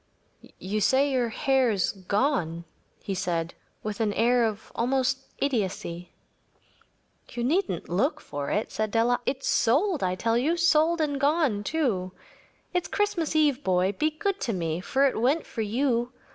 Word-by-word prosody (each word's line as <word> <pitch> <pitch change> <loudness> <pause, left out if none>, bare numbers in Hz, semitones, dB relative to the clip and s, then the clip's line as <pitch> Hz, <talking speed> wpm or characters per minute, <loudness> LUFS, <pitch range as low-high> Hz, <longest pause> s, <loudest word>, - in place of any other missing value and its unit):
“You 210 +3 -3
say 270 +6 +3
your 250 -3 +1
hair 265 +2 +2
is 200 -5 +1
gone?‚ÄĚ 185 - -3
he 195 - -3
said, 170 -2 -2 0.3
with 210 0 -4
an 215 -2 +1
air 230 -2 +2 0.2
almost 260 +2 +1
of - - -28
idiocy. 190 -9 -2 1.2
“You 240 -1 -4
needn’t 305 - 0
look 220 - 0
for 145 -1 -5
it,‚ÄĚ 210 - -1
said 215 0 -1
Della. 235 +3 +2
“It’s 265 0 -2
sold, 310 - +2
I 185 -1 0
tell 230 +5 +1
you‚ÄĒsold 330 +2 +3
and 285 -2 -1
gone, 285 -8 +2
too. 205 - -1 0.6
It’s 360 -1 0
Christmas 380 -7 -1
Eve, 290 -3 +3
boy. 185 +1 +2
Be 305 +10 0
good 395 +6 -3
to 230 - -1
me, 165 -3 -2
for 270 +8 +2
it 260 -5 0
went 280 +7 +2
for 225 - -5
you. 240 +2 0
240 Hz, 155 wpm, -26 LUFS, 200-285 Hz, 1.2 s, say